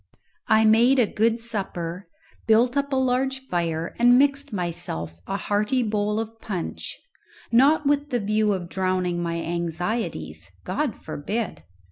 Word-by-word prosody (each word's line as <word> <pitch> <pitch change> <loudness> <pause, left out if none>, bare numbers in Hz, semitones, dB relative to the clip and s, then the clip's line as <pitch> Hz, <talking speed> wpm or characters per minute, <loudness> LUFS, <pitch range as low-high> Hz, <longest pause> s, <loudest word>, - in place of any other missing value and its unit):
I 220 0 +5
made 235 +5 +5
a 245 - +5
good 225 +2 +1
supper, 195 -5 -4 0.4
built 235 +3 +4
up 280 0 0
a - - +1
large 260 +1 +1
fire, 170 -8 -2
and 245 +1 +6
mixed 280 0 +2
myself 125 - -4
a 195 - -1
hearty 210 +6 0
bowl 210 -1 0
of 225 0 -6
punch, 185 -6 -5 0.5
not 285 +6 +5
with 290 +1 +1
the 245 -3 0
view 215 0 +1
of 180 -3 -4
drowning 185 -1 -1
my 170 -1 -2
anxieties 175 +7 -3 0.2
God 295 -7 -1
forbid! 180 - -4
215 Hz, 140 wpm, -24 LUFS, 180-245 Hz, 0.5 s, and